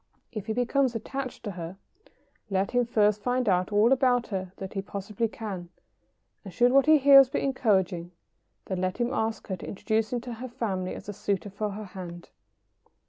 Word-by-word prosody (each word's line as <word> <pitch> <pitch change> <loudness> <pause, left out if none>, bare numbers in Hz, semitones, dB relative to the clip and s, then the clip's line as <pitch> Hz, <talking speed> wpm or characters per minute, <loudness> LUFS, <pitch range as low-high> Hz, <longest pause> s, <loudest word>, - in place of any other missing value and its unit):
] - - -44
If 215 -3 -6
he 220 - 0
becomes 250 +1 +1
attached 265 +3 -5
to 210 - -3
her, 175 0 -7 0.7
let 195 0 0
him 245 -1 +2
first 210 -2 +2
find 250 +1 0
out 185 0 +2
all 210 +4 +4
about 250 -3 +3
her 190 -3 -3
that 190 -1 -7
he 195 - -2
possibly 200 +3 -3
can, 195 -6 -6 0.7
and 195 - -8
should 245 +7 +3
what 275 +2 +5
he 310 0 +8
hears 275 -2 +8
be - - -1
encouraging, 190 -10 +1 0.6
then 185 -2 -3
let 185 0 -1
him 240 +2 0
ask 220 -4 -1
her 190 - -2
to - - -9
introduce 215 +2 -1
him 245 - 0
to 245 0 -6
her 245 +3 -6
family 195 -6 -3
as 200 - -10
a 205 - -4
suitor 200 -1 -2
for 210 +2 -2
her 215 +1 -6
hand. 180 -3 -9
215 Hz, 195 wpm, -27 LUFS, 190-245 Hz, 0.7 s, he